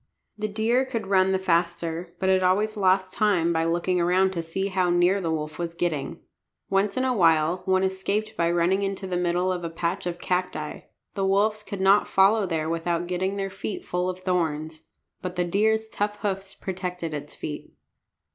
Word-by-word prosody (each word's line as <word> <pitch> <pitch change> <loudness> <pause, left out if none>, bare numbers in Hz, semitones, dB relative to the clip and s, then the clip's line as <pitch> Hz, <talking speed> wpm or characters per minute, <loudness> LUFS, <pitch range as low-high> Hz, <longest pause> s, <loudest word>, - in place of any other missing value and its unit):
The 215 0 -2
deer 225 +5 +1
could 235 -5 -4
run 190 -1 +3
the 190 - +2
faster, 170 -1 -1
but 190 - 0
it 190 0 +4
always 205 +4 +2
lost 190 -2 +2
time 180 -6 +2
by 165 0 +1
looking 175 +2 +1
around 185 +2 +3
to 170 - -2
see 165 +4 -3
how 185 -2 +1
near 175 +3 +3
the 165 - -2
wolf 155 0 -3
was 170 -1 -3
getting. 165 -5 -2 0.5
Once 195 +2 +1
in 255 - +1
a 255 - +2
while 165 -4 +3
one 190 0 +2
escaped 200 +3 -1
by 170 -3 +1
running 175 +3 +2
into 195 0 -3
the 185 -1 -3
middle 180 +1 +1
of 180 -1 -3
a 170 - -2
patch 170 +3 -2
of 175 -1 -3
cacti. 180 -4 -2 0.3
The 195 - -1
wolves 210 +2 +2
could 200 -2 -6
not 195 +2 +5
follow 195 +1 +4
there 160 -2 -1
without 165 +1 -1
getting 185 +3 -2
their 195 -1 -2
feet 195 +1 -5
full 180 +1 -1
of 185 0 -5
thorns. 160 -3 -2 0.3
But 180 -1 -5
the 175 -1 +1
deer's 220 +5 +1
tough 210 -1 -2
hoofs 195 -1 -3
protected 180 -3 -4
its 150 0 -5
feet. 150 -1 -6
185 Hz, 195 wpm, -25 LUFS, 170-195 Hz, 0.5 s, not